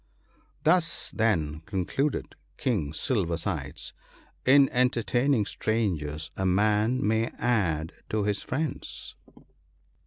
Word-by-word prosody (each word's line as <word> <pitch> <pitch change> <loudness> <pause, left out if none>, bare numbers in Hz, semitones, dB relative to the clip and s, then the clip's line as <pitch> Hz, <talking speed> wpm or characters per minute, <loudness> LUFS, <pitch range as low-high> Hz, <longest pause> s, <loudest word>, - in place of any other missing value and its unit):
" - - -36
Thus, 175 -2 +2
then," 80 -10 +1
concluded 115 +10 -1 0.2
King 105 - 0
Silver 85 - 0
sides, 80 - -4 0.3
" - - -32
in 140 -1 +7
enter 125 -2 +2
taining 120 -2 +2
strangers 80 -9 -1
a 95 - -2
man 105 +6 +2
may 110 +1 +2
add 90 -10 0 0.2
to 110 -1 0
his 105 0 0
friends." 145 +2 -3
110 Hz, 115 wpm, -27 LUFS, 85-125 Hz, 0.3 s, in